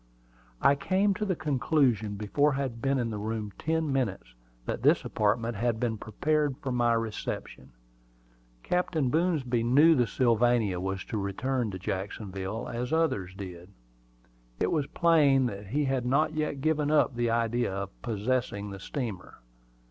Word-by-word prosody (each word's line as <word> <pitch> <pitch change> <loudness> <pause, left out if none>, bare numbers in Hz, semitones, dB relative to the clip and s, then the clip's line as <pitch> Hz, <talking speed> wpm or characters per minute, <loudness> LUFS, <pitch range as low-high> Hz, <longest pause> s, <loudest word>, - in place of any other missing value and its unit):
I 140 - +6
came 190 +7 +1
to 210 +3 -3
the 190 -3 0
conclusion 135 -8 +1
before 140 +9 +1
I 135 - -1
had 120 -4 -4
been 135 +1 +1
in 120 -3 -1
the 105 - -4
room 105 -1 -4
ten 160 -2 0
minutes, 100 - -2 0.3
that - - -3
this - - +3
apartment 115 +1 0
had 115 0 0
been 115 -3 -1
prepared 145 +6 0
for 135 - -4
my 120 -1 +2
reception. 110 - -4 0.9
Captain 160 -7 0
Boomsby 150 -8 +1
knew 140 +8 +6
that 125 -6 +3
the - - -8
Sylvania 115 -4 +2
was 95 0 -3
to 110 - -3
return 115 +5 -1
to 95 - -5
Jacksonville, 95 +2 -4
as 120 +1 -4
others 105 - 0
did. 90 -2 -8 0.9
It - - +1
was 150 -4 0
plain 145 -6 +4
that 100 -4 -5
he 145 +7 0
had 130 -2 -1
not 150 +5 +2
yet 150 -3 -2
given 150 -1 +1
up 150 -4 +3
the 120 -1 0
idea 115 0 0
of 100 0 -6
possessing 110 -2 -2
the 100 - -7
steamer. 110 -4 -5
120 Hz, 160 wpm, -28 LUFS, 105-145 Hz, 0.9 s, I